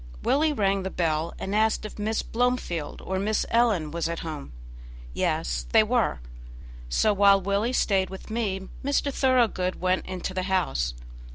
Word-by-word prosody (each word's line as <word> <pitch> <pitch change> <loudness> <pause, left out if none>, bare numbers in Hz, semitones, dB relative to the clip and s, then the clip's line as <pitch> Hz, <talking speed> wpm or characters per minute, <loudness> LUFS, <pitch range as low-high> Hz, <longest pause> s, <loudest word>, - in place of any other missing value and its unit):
Willie 305 +2 +3
rang 200 -7 +1
the 190 - -3
bell, 165 -2 -1
and 195 - -4
asked 220 +1 +2
if 215 - -8
Miss 220 +2 -1
Blomefield 230 -10 -2
or 190 0 -2
Miss 210 +2 0
Ellen 220 -10 +2
was 165 0 -2
at 170 - -4
home. 155 - -6 0.6
Yes, - - -1
they - - +7
were. - - 0 0.7
So, 210 - +3
while 200 0 +5
Willie 200 +5 0
stayed 195 -6 +2
with 190 +3 -9
me, 195 -4 -2 0.2
Mr. 280 0 0
Thoroughgood 240 -9 +2
went 185 0 0
into 185 0 -4
the 185 - -1
house. 65 - 0
195 Hz, 160 wpm, -26 LUFS, 170-220 Hz, 0.7 s, they